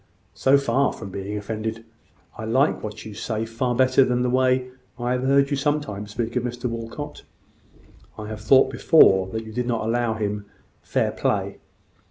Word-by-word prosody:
"So 135 Hz, +1 st, +4 dB
far 140 Hz, 0 st, +1 dB
from 95 Hz, -, -9 dB
being 100 Hz, +2 st, -4 dB
offended, 110 Hz, +2 st, -4 dB, 0.5 s
I -, -, -7 dB
like 130 Hz, +7 st, +2 dB
what 105 Hz, 0 st, -7 dB
you 110 Hz, -, -7 dB
now 100 Hz, -, -11 dB
say 110 Hz, -1 st, -2 dB
far 120 Hz, +2 st, -2 dB
better 130 Hz, +1 st, +4 dB
than 125 Hz, -1 st, +1 dB
the 125 Hz, -, 0 dB
way 130 Hz, 0 st, +2 dB, 0.3 s
I 120 Hz, 0 st, -2 dB
have 125 Hz, 0 st, 0 dB
heard 140 Hz, +2 st, +3 dB
you 140 Hz, -, +1 dB
sometimes 135 Hz, -8 st, -2 dB
speak 115 Hz, +2 st, -4 dB
of 125 Hz, -, +2 dB
Mr 125 Hz, +1 st, -3 dB
Walcot. 115 Hz, +6 st, -6 dB, 1.0 s
I 105 Hz, -, -6 dB
have 110 Hz, -1 st, -7 dB
thought 130 Hz, +5 st, +5 dB
before 95 Hz, -, +5 dB
that 110 Hz, +3 st, -5 dB
you 110 Hz, -, -9 dB
did 125 Hz, +1 st, -2 dB
not 115 Hz, -3 st, -1 dB
allow 115 Hz, 0 st, 0 dB
him 105 Hz, -1 st, -3 dB, 0.3 s
fair -, -, 0 dB
play. -, -, -1 dB
120 Hz, 185 wpm, -23 LUFS, 110-130 Hz, 1.0 s, thought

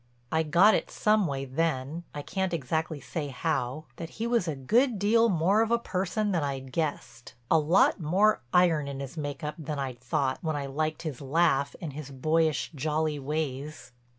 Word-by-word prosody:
I 160 Hz, -, +2 dB
got 175 Hz, +7 st, +5 dB
it -, -, 0 dB
some 210 Hz, -3 st, +2 dB
way 135 Hz, -2 st, -3 dB
then—I 145 Hz, +2 st, -3 dB
can't 190 Hz, 0 st, -1 dB
exactly 160 Hz, +1 st, -2 dB
say 150 Hz, +1 st, -4 dB
how—that 155 Hz, +3 st, -3 dB
he 225 Hz, -, -5 dB
was 235 Hz, -6 st, +1 dB
a 155 Hz, -, -1 dB
good 225 Hz, -, +2 dB
deal 225 Hz, +4 st, +4 dB
more 190 Hz, +4 st, +3 dB
of 225 Hz, -, +1 dB
a 235 Hz, -, +3 dB
person 205 Hz, -1 st, -1 dB
than 170 Hz, -4 st, +1 dB
I'd 135 Hz, -2 st, -4 dB
guessed—a 135 Hz, -3 st, -2 dB
lot 165 Hz, +7 st, +3 dB
more 190 Hz, +7 st, +3 dB
iron 165 Hz, -5 st, +3 dB
in 140 Hz, -1 st, -5 dB
his 135 Hz, +1 st, -6 dB
make 145 Hz, -1 st, -5 dB
up 150 Hz, 0 st, -2 dB
than 150 Hz, -1 st, -4 dB
I'd 130 Hz, -3 st, -4 dB
thought 130 Hz, +1 st, -1 dB
when 160 Hz, -2 st, -2 dB
I 140 Hz, -1 st, -2 dB
liked 155 Hz, +4 st, -2 dB
his 150 Hz, -6 st, -5 dB
laugh 140 Hz, -1 st, +2 dB
and 160 Hz, -6 st, -6 dB
his 145 Hz, -1 st, -7 dB
boyish, 155 Hz, +3 st, +1 dB
jolly 155 Hz, +1 st, -1 dB
ways. 145 Hz, -1 st, -4 dB
155 Hz, 180 wpm, -28 LUFS, 140-175 Hz, -, got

